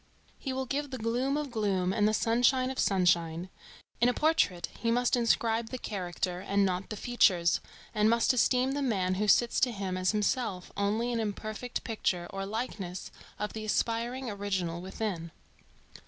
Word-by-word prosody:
He 270 - -3
will 260 0 -2
give 285 +3 -2
the 260 - -5
gloom 245 +5 0
of 295 -3 -3
gloom 195 -5 0
and 210 -1 +3
the 215 - +2
sunshine 245 +3 +3
of 265 - -6
sunshine. 175 -2 +2 0.5
In 240 - +6
a 245 - 0
portrait 300 - +2
he 230 - 0
must 245 +2 +3
inscribe 230 -1 +1
the 255 - -4
character 180 -4 -3
and 200 +1 +1
not 185 +1 -2
the 215 - -5
features, 185 -8 +3 0.3
and 210 -1 +3
must 235 +2 +3
esteem 255 +1 +3
the 285 +1 -1
man 195 -8 +1
who 210 - +1
sits 235 +3 +4
to 250 - +3
him 195 -4 -3
as 185 0 +1
himself 210 -3 -1
only 215 +4 0
an 230 - 0
imperfect 215 +3 -4
picture 190 -6 -1
or 195 0 -4
likeness 200 -5 -4 0.3
of 210 0 -3
the 220 - -5
aspiring 235 +4 -1
original 195 -5 -2
within. 185 -3 -4
215 Hz, 170 wpm, -30 LUFS, 190-245 Hz, 0.5 s, In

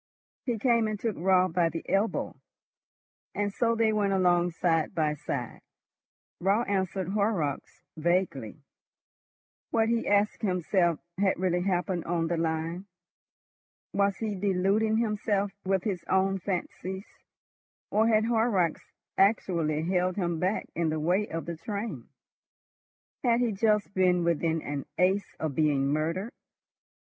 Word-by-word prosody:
He 240 -2 0
came 235 -1 +2
and 215 -1 -3
took 225 -3 -2
Raut 185 0 +3
by 170 -2 +3
the 165 +1 -6
elbow, 200 +3 0 1.0
and 205 -1 -1
so 230 +1 +1
they 225 -1 +2
went 205 -2 +1
along 175 -2 +3
side 165 0 0
by 155 -2 +1
side. 135 -4 -5 0.8
Raut 200 +6 +2
answered 190 -2 -1
Horrocks 200 -8 -1
vaguely. 160 - -1 1.1
What, 225 -1 +2
he 235 0 0
asked 205 +1 +2
himself, 180 -3 +1 0.2
had 195 -1 +2
really 180 -1 +1
happened 180 -1 -1
on 170 -1 0
the 170 - 0
line? 165 +3 -2 1.1
Was 200 -1 +2
he 220 -2 -2
deluding 200 +3 +1
himself 210 -3 0
with 190 -1 +1
his 190 -5 -2
own 190 +1 +2
fancies, 190 +1 -4 0.9
or 220 +2 +3
had 220 -1 +3
Horrocks 220 -7 +1 0.4
actually 170 -6 +2
held 180 +1 +1
him 175 -4 -1
back 185 +5 0
in 170 -1 0
the 155 0 -1
way 180 +7 +1
of 165 0 -5
the 170 -1 -5
train? 210 +5 -5 1.1
Had 235 -2 +3
he 245 -2 +1
just 210 0 +1
been 180 -2 +3
within 165 -1 0
an 145 -1 -4
ace 190 +3 +1
of 155 -3 -2
being 140 -2 +2
murdered? 165 +8 -1
185 Hz, 135 wpm, -28 LUFS, 170-205 Hz, 1.1 s, Raut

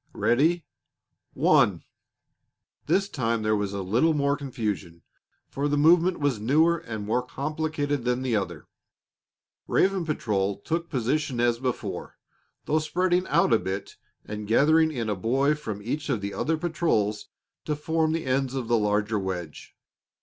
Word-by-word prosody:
Ready? 160 +8 +2 0.7
One!" - - +3 1.0
This 195 +1 +2
time 115 - -1
there 110 0 +2
was 105 -1 -1
a 100 -1 -4
little 120 - +2
more 140 -1 +2
confusion, 105 - -4 0.4
for 140 +2 -2
the 145 0 +1
movement 170 +4 +4
was 140 -6 0
newer 160 +9 +3
and 110 -10 -6
more 115 +4 +1
complicated 145 +1 -2
than 125 +1 0
the 125 -3 0
other. 85 -6 -3 1.0
Raven 195 -1 +2
patrol 100 -10 -1
took 165 +10 -3
position 130 0 -1
as 120 -1 +2
before, 130 -1 -4 0.5
though 155 - +2
spreading 180 +3 0
out - - +3
a 115 - +5
bit 95 +1 -5 0.3
and 105 0 -6
gathering 155 +7 +4
in 120 -6 -3
a 105 - 0
boy 135 +9 +1
from 110 -9 -6
each 145 +7 -3
of 125 -6 +1
the 100 0 -4
other 160 +1 0
patrols 155 -11 0 0.4
to 150 - -1
form 160 +1 0
the 165 0 -2
ends 130 0 0
of 130 -4 -3
the 120 -1 +3
larger 105 +1 +1
wedge. 90 -5 -6
130 Hz, 150 wpm, -26 LUFS, 105-155 Hz, 1.0 s, a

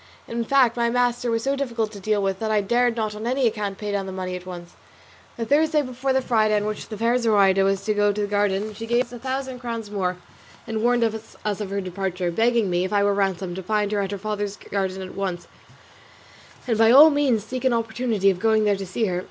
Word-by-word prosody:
In 235 0 -2
fact 255 -1 +3
my 235 -1 +1
master 245 0 0
was 230 -1 0
so 275 +1 +1
difficult 235 -6 -2
to 205 - -9
deal 205 +1 0
with 195 -1 -1
that 220 - -2
I 215 -1 +2
dared 240 +3 +1
not 215 -2 -2
on 215 +2 -5
any 260 +1 +1
account 210 -3 -1
pay 210 -1 -4
down 200 -1 -2
the - - -5
money 185 -1 -4
at 180 0 -9
once. 175 -1 -9 0.6
The 230 - -2
Thursday 300 +3 +3
before 255 +1 -2
the 265 0 +1
Friday 215 -4 +2
on 210 0 0
which 215 0 -5
the 215 - -6
fair 235 +3 +2
Zoraida 200 -4 +4
was 195 0 0
to 215 - +1
go 205 0 +2
to 210 +1 -3
the - - +1
garden 205 +1 0
she 225 +2 -7
gave 240 +2 +2
us 240 - -20
a 245 - -7
thousand 260 0 -4
crowns 230 -3 -5
more, 185 -3 -1 0.5
and 220 -1 -3
warned 240 0 +3
us 220 0 -3
of 210 -1 -2
her 200 0 -2
departure, 185 -1 -3
begging 230 +2 +2
me, 175 0 0
if 185 - -3
I 205 -1 +2
were 200 0 +3
ransomed, 190 -2 -1
to - - -4
find 210 +2 -1
out 200 -2 0
her 200 - -4
father's 205 0 -3
garden 190 -1 -3
at 185 - -9
once, 190 -3 -4 1.2
and 225 -3 0
by 225 0 +6
all 290 +6 +9
means 275 -7 +1
to - - -19
seek 255 0 -4
an 260 - +4
opportunity 225 -3 +1
of 180 - -5
going 220 0 +3
there 205 -1 +2
to 195 -1 -6
see 220 +5 -1
her. 180 -3 -1
215 Hz, 250 wpm, -23 LUFS, 195-235 Hz, 1.2 s, all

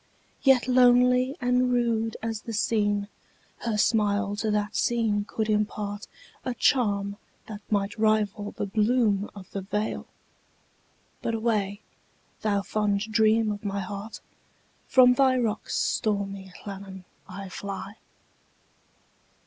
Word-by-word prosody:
Yet 265 -3 +4
lonely 250 +2 +4
and 250 0 +2
rude 230 -2 0
as 225 -1 -3
the 230 - -7
scene, 205 -2 +1 0.5
Her 230 -3 -2
smile 205 -2 +2
to 215 +1 -1
that 210 0 -1
scene 220 -4 +1
could 220 +1 -2
impartA 210 -1 -2 0.5
charm 200 -6 +1 0.3
that 215 -1 -8
might 205 0 -1
rival 215 -1 +1
the - - -4
bloom 210 0 +1
of 190 -3 -11
the 195 - -4
vale,—But 210 +2 -7
away, 215 -3 -1 0.6
thou 200 -2 +1
fond 205 -1 0
dream 220 0 +3
of 205 0 -6
my 200 -1 -2
heart! 200 +3 -7 0.7
From 250 -1 +6
thy 260 0 +3
rocks, 220 -4 -2
stormy 200 -2 -1
Llannon, 195 -2 -8 0.3
I 195 +1 -7
fly. 195 +2 -6
210 Hz, 115 wpm, -26 LUFS, 200-230 Hz, 0.7 s, From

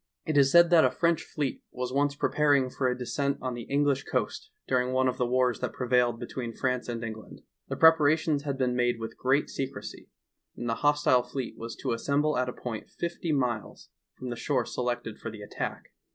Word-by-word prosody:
It 155 - -1
is 135 -1 +5
said 170 +2 +7
that 165 -2 +7
a - - +5
French 170 -1 +1
fleet 145 -3 -3
was 125 0 -4
once 140 +1 +1
preparing 145 -3 +2
for 130 - 0
a 125 0 0
descent 140 +3 -1
on 130 -1 -3
the 120 -1 -7
English 140 -1 +2
coast - - -2 0.2
during 125 0 +1
one 130 0 +3
of 130 0 -1
the 125 - +1
wars 125 -2 +2
that - - -3
prevailed 125 -2 +1
between 120 -1 -5
France 125 -2 -1
and 115 -1 -4
Eng 110 -1 -4
land. - - -14 0.3
The - - -3
preparations 160 -2 +4
had 140 -2 -3
been 125 -2 0
made 120 -1 +1
with 115 0 -6
great 135 +3 +1
secrecy, 135 0 -6 0.5
and 120 - -4
the 115 - +1
hostile 145 -3 +4
fleet 125 0 -5
was 115 +1 -7
to - - -1
assem 140 +5 +1
ble 155 0 +1
at 125 0 0
a - - -5
point 115 -3 -6
fifty 170 -1 -3
miles 125 -7 -2 0.3
from 125 -1 -6
the - - -3
shore 125 0 0
selected 120 -3 -3
for 115 - -5
the 105 -2 -9
attack. - - -5
130 Hz, 210 wpm, -28 LUFS, 120-145 Hz, 0.5 s, said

